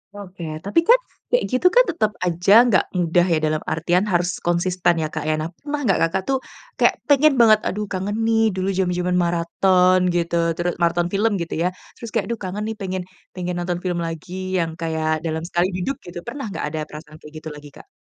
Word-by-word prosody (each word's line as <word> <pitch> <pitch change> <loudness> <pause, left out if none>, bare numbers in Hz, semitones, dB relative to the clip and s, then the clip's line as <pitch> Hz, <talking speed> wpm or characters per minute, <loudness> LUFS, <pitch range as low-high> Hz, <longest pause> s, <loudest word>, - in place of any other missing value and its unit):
Oke, 190 -3 -9 0.2
tapi 200 +11 +2
kan 480 - +8 0.3
kayak - - +2
gitu 255 +8 +3
kan, - - +8
tetep 220 -11 0
aja 175 +2 +2 0.2
gak 190 - +3
mudah, 175 0 +2
ya 170 -3 +2
dalam 155 0 +1
artian, 175 +5 +1
harus 175 -2 0
konsisten 175 +1 +1
ya, 155 - -3
Kak, - - -4
ya? 155 - +2
Nah, 155 +1 -3
pernah 295 +7 -5
nggak 195 -7 +2
kakak 190 +3 -2
tuh, 270 - +3 0.4
kayak - - +4 0.2
pengen 285 +1 +5
banget, 225 -4 +6
aduh 210 +2 -2
kangen 195 +2 -2
nih, 225 0 +3
dulu 190 +1 -1
jaman-jaman 180 -1 0
maraton, 180 +2 +3 0.2
gitu 170 0 0 0.2
teru 175 +1 -1
maraton 170 0 +1
film, 215 +3 +2
gitu 170 - -4
ya, 170 - +2 0.3
terus 235 - -7
kayak, - - +1
aduh 230 - -3
kangen 190 +3 -4
nih, - - -6
pengen 185 -1 -3 0.3
pengen 180 -1 -3
nonton 175 0 -2
film 175 -2 -1
lagi, 180 +3 -5
yang 165 -3 0
kayak 160 -1 -1
dalam 160 0 -2
sekali 175 +1 0
duduk, 185 +9 -3
gitu. 175 0 -7
Pernah 270 +3 -6
nggak - - -4
ada 155 - -3
perasaan 155 0 -11
kayak 150 0 -14
gitu 155 - -5
lagi, 150 0 -11
Kak? - - -14
180 Hz, 205 wpm, -21 LUFS, 170-200 Hz, 0.4 s, kan